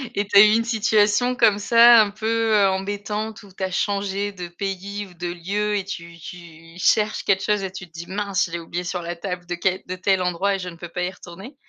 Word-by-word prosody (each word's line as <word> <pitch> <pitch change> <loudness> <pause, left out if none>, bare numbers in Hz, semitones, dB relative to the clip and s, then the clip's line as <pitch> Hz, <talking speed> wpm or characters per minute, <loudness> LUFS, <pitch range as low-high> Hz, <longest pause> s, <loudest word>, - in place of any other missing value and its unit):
et 205 - 0
tu 200 - +3
as - - +11
eu 210 - +7
une 230 - +2
situation 220 +1 +2
comme 210 -3 +3
ça, 235 +2 +7
un 210 -1 0
peu, 225 +1 0
heu, 200 -1 +5
embêtante 205 +3 -4
où 200 - -15
tu 185 - -14
as 185 - -2
changé 200 +1 -1
de 180 -3 -7
pays 195 +3 -5
ou 180 - -16
de 175 0 -5
lieu 200 +5 -2
et 195 - -2
tu 170 -3 -8
tu 165 -1 -12
cherches 215 +3 +1
quelque 190 -1 +2
chose 210 -2 0
et 190 - -4
tu 190 -2 -9
te - - -33
dis: 165 +1 -9
«Mince, 200 -1 -1
je - - -13
l'ai 170 - -3
oublié 170 +2 -5
sur 180 0 -3
la 170 0 -5
table 180 0 -5
de 175 - -3
quel 185 +1 -1
de 185 - -4
tel 190 0 +1
endroit 180 +3 0
et - - -5
je 180 - -5
ne 170 - -12
peux 175 - -8
pas 180 +1 -4
y 180 - -2
retourner?». 190 - -12
195 Hz, 255 wpm, -22 LUFS, 180-210 Hz, -, as